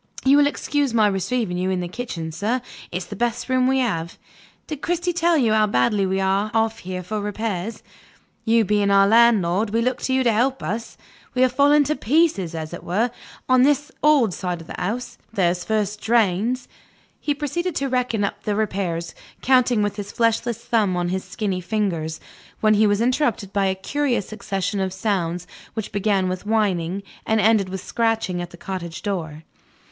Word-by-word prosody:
You 275 +2 +6
will 290 0 +5
excuse 285 -3 -1
my 220 -2 +5
receiving 195 -1 -1
you 185 +1 0
in 185 -1 0
the 175 - -3
kitchen, 175 -6 -5
sir; 215 +10 -1 0.3
it's 180 +1 -3
the - - -8
best 240 0 -1
room 255 0 +3
we 265 0 +2
have. 170 -10 -1 0.5
Did 300 -2 -6
Cristy 350 +1 -1
tell 340 0 +2
you 235 -6 +3
how 215 -1 +4
badly 195 +6 +2
we 190 +1 0
are 195 +2 +1
off 225 0 +1
here 185 -1 -5
for 210 +4 -3
repairs? 210 0 -3 0.6
You 225 -1 +3
being 205 0 +2
our 195 0 +6
landlord, 215 -3 +4
we 225 +3 0
look 250 +2 0
to 260 - -1
you 260 - +2
to 235 - +3
help 260 +5 +1
us. 225 +3 -4 0.4
We 255 - +4
are 255 - +5
falling 285 +3 +4
to 305 +2 -1
pieces, 250 - +1
as 160 0 -5
it - - -7
were, 220 +8 0 0.4
on 255 -1 +5
this 290 +2 +2
old 285 -10 +4
side 180 -1 -3
of 165 - -11
the - - -8
house. 225 +7 -3
There's 180 -4 +1
first 215 -1 -1
drains 230 +2 +1 0.3
" - - -35
He 290 - 0
proceeded 325 +4 -2
to 275 - 0
reckon 250 -5 0
up 200 - -3
the 210 - -1
repairs, 185 -5 -2 0.3
counting 250 -4 +4
with 205 0 -2
his 205 -1 -5
fleshless 230 0 +1
thumb 205 -6 +1
on 175 0 -1
his 185 +1 -2
skinny 195 -5 -3
fingers, 175 -6 -2 0.4
when 215 -1 +4
he 215 0 +4
was 205 +1 +2
interrupted 240 -5 0
by 200 -1 +2
a 190 - 0
curious 245 +2 -1
succession 200 -2 -3
of 190 -1 -1
sounds 180 -4 -1 0.3
which 220 -2 -4
began 200 -2 +1
with 185 +2 -4
whining, 200 -4 0 0.2
and 220 0 +1
ended 210 -2 +3
with 190 0 -5
scratching 225 -6 0
at 175 - -6
the 175 - -13
cottage 170 -3 -6
door. 165 -6 -4
210 Hz, 195 wpm, -22 LUFS, 185-245 Hz, 0.6 s, You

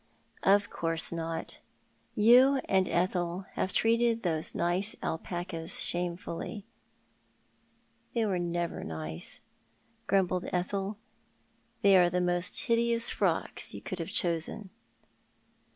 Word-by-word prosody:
"Of 200 +1 +3
course 165 -1 -1
not. 165 -1 -4 0.6
You 250 +6 +6
and 190 -1 +2
Ethel 175 +1 0
have 190 - -1
treated 230 +1 +2
those 160 -3 -1
nice 180 +5 +1
alpacas 165 0 -3
shamefully." 175 +3 -4 0.8
" - - -39
They 230 -1 +2
never 175 -2 -1
were - - -6
nice," 80 +1 -6 0.7
grumbled 185 -2 +1
Ethel. 195 +3 -2 0.4
" - - -39
They 200 -1 +7
are 175 -1 +5
tho 180 +1 0
most 175 +1 +1
hideous 235 0 +2
frocks - - 0
you - - -7
could 185 - -5
have 165 +2 -4
chosen." 175 +2 -1
180 Hz, 115 wpm, -30 LUFS, 170-205 Hz, 0.8 s, They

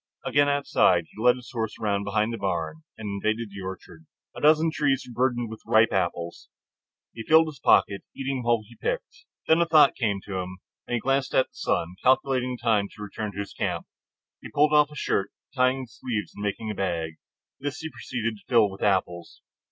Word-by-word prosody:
Again 145 0 +3
outside, 95 -11 +3
he 110 - -10
led 125 +1 +5
the 125 - -11
horse 110 -3 -3
around 100 -2 0
behind 105 +3 0
the - - -3
barn 80 -5 -2 0.2
and 110 -1 -6
invaded 110 +3 -2
the 100 0 -8
orchard. 95 -4 -9 0.3
A - - -8
dozen 155 +2 +5
trees 140 -3 0
were 125 - -10
burdened 120 0 0
with 110 - -9
ripe 110 +1 +4
apples. 85 -2 -2 0.6
He 115 - -7
filled 160 +7 +5
his 145 -4 -11
pockets, 100 -4 +3
eating 135 -1 -2
while 120 -2 +1
he 120 - -16
picked. - - -4 0.2
Then 160 +1 +5
a 170 - +2
thought 155 -4 +6
came 105 -5 0
to 95 -1 -5
him, 90 0 -6 0.3
and 120 - -1
he - - 0
glanced 135 +2 0
at 130 - +3
the - - -48
sun, 90 +3 -2
calculating 130 -1 +2
the 120 - -8
time 105 -3 +3
of - - -12
his - - -18
return 105 0 -5
to 100 +1 -3
camp. - - -2 0.6
He - - -9
pulled 150 +1 +3
off 150 0 +5
his 150 - -11
shirt, 100 - 0 0.3
tying 130 0 +2
the - - -10
sleeves 115 -2 -4
and 105 - -8
making 105 +2 -2
a - - -3
bag. 85 -5 -2 0.4
This 145 +1 -4
he 160 0 -5
proceeded 115 -3 -4
to - - -21
fill 115 -5 +4
with 95 - -11
apples. 90 -4 -1
115 Hz, 210 wpm, -26 LUFS, 100-135 Hz, 0.6 s, thought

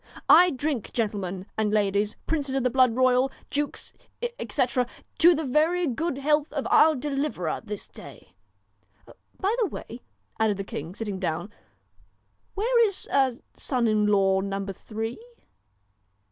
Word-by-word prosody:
I 360 +1 +8
drink, 275 - -3
gentlemen 195 -5 -2
and 215 -1 +1
ladies, 205 0 +1
princes 285 -4 -1
of 270 - 0
the 250 - +1
blood 255 -2 +4
royal, 255 +1 +3 0.2
dukes, 290 0 -3 0.5
etc.... 250 -2 0 0.3
to 345 +1 +7
the 315 - -2
very 320 +7 +2
good 305 +2 -2
health 295 +1 +1
of 280 -3 -2
pur 315 0 +5
deliverer 275 - -2
this 210 -2 -6
day. - - -13 1.1
By 405 +3 +1
the 435 - +2
way,' 240 -7 -8 0.4
added 215 -3 +2
the 195 - -3
king, 170 -1 -7
sitting 205 -4 -4
down, 175 +2 -3 0.5
' 100 +2 -44
where 470 +4 +3
is 395 - -3 0.5
son 250 -3 -1
in 215 -1 +2
law 195 -2 +3
number 195 0 -3
Three 225 +4 -5
245 Hz, 140 wpm, -26 LUFS, 200-295 Hz, 1.1 s, I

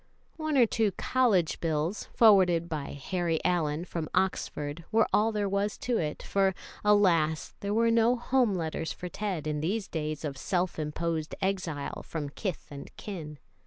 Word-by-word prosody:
One 310 -2 0
or 245 - +7
two 220 -3 +1
college 215 -11 +2
bills, 160 +4 -1
forwarded 185 -7 +5
by 155 -4 -4 0.2
Harry 175 -4 0
Allyn 165 -2 +1
from 165 -3 -4
Oxford, 170 -4 -1
were 225 0 +4
all 220 +2 +4
there 210 -2 -1
was 200 +1 -1
to 245 -2 0
it, 150 -2 -3
for, 195 -1 +1 0.3
alas! 175 -7 +3
there 200 - -3
were 230 +2 +3
no 230 +2 +4
home 245 -3 +2
letters 160 -1 -3
for 180 - -6
Ted 190 -6 -3
in 150 -1 -1
these 195 +6 -1
days 155 -1 -3
of 140 -3 -4
self 180 +1 -1
imposed 155 +1 -2
exile 180 -7 -2
from 150 -3 -5
kith 185 +4 -4
and 140 -1 -8
kin. 160 -7 -7
180 Hz, 165 wpm, -29 LUFS, 155-210 Hz, 0.3 s, or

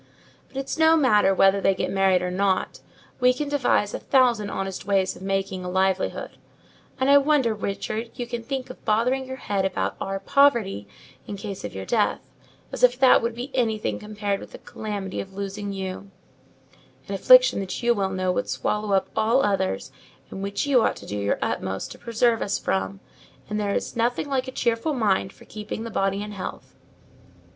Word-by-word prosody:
But 270 - -12
it's 275 +4 -3
no 320 0 +6
matter 210 -9 +4
whether 195 +1 +4
they 195 - +3
get - - -2
married 190 -2 +3
or 180 - -2
not: 190 0 0 0.4
we 250 0 +4
can 290 +2 -3
devise 255 -7 +1
a - - -3
thousand 240 -6 +2
honest 195 -1 -4
ways 195 -2 +1
of - - -13
making 195 -1 -2
a 180 - -4
livelihood. 190 0 -1 0.6
And 260 - +1
I 285 0 +7
wonder, 280 -5 +2
Richard, 215 +2 -4
you 245 - -4
can 240 0 -5
think 255 +1 -4
of - - -14
bothering 250 +5 +1
your 260 - -5
head 200 -6 -2
about 190 -1 -1
our 195 0 -3
poverty 225 - +2 0.4
in 200 - -5
case 195 -1 -6
of 105 - -6
your 95 0 -5
death; - - +1 0.5
as - - -6
if 250 0 +5
that 260 -1 +6
would 230 0 -2
be 255 +3 -6
anything 220 -4 0
compared 205 -1 -3
with - - -12
the - - -8
calamity 205 -3 -5
of 195 0 -11
losing 200 +1 -4
you—an 195 0 -10
affliction - - +6
that 195 +4 -5
you 240 0 +4
well 195 -4 -1
know 185 -1 -1
would 170 - -2
swallow 210 -1 -1
up 190 - +2
all 225 +5 +3
others, 95 - -1 0.4
and 195 - -6
which 200 +6 -2
you 270 -4 +4
ought - - +1
to - - -11
do 105 - -5
your 100 0 0
utmost 95 0 -3
to - - -11
preserve 235 0 +1
us 200 - 0
from: 95 0 -2 0.5
and 210 0 -2
there 200 -1 -1
is - - -3
nothing 240 +4 0
like 265 -2 -1
a - - -4
cheerful 240 +4 0
mind 200 -5 +1
for - - -18
keeping 215 +1 -6
the 230 - -6
body 195 0 0
in 210 - -7
health." 200 -2 -7
210 Hz, 195 wpm, -24 LUFS, 195-245 Hz, 0.6 s, I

